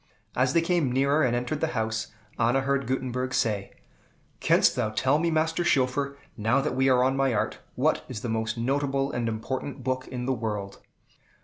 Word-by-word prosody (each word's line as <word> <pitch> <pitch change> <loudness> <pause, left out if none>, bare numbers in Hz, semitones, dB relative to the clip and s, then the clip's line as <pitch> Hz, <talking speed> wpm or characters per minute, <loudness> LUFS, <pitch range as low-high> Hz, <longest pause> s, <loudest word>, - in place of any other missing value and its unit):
As 130 +1 +2
they 170 - +4
came 170 -6 +1
nearer 140 +4 +2
and 125 -4 +2
entered 125 +5 -2
the 160 - 0
house, 110 -1 -1 0.3
Anna 120 +4 +3
heard 140 -2 0
Gutenberg 130 0 -2
say, 105 -5 0 0.7
"Canst - - +4
thou 120 -4 0
tell 130 +7 +2
me, 170 +1 +1
Master 160 +1 +1
Schoeffer, 140 -1 +1 0.2
now 110 +5 +2
that 145 +2 -1
we 130 +1 +3
are 125 -1 +4
on 130 +1 +2
my 135 -3 +2
art, 105 - -1 0.2
what - - +1
is 115 -5 -5
the 120 - -4
most 110 0 -1
notable 135 +2 0
and 120 -1 -1
important 130 +4 -4
book 130 0 -2
in 125 -1 -5
the 135 - +1
world?" 105 -4 -4
130 Hz, 190 wpm, -27 LUFS, 115-140 Hz, 0.7 s, they